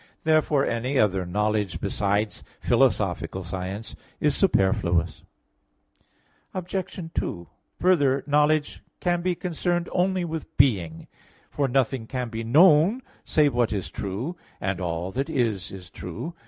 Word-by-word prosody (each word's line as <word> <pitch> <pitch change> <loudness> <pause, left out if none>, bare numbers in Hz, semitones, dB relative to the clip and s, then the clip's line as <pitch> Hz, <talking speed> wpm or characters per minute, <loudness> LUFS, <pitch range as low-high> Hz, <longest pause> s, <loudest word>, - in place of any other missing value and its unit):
Therefore 155 -3 +3
any 125 +4 -1
other 95 -5 +2
knowledge 105 0 0
besides 105 +1 -1 0.2
philosophical 95 - +1
science 95 +4 -5 0.2
is 150 -1 +2
superfluous. 90 - +1 1.3
Obj. 180 -2 -4
2: 85 -1 -3 0.3
Further, 145 -7 +3
knowledge 150 +1 +2 0.2
can 175 -1 0
be 180 0 0
concerned 175 0 -1
only 185 0 +1
with 160 -2 -6
being, 90 - +2 0.5
for 140 -2 0
nothing 130 -2 0
can 125 -2 -3
be 115 0 -4
known, 165 - +5 0.2
save 150 -3 +3
what 120 -1 +1
is 100 -4 -3
true; 105 - -4 0.2
and 95 0 -2
all 85 +1 -2
that 135 +8 -2
is, 115 - -1
is 90 -2 -10
true. 90 - -6
125 Hz, 125 wpm, -25 LUFS, 95-160 Hz, 1.3 s, known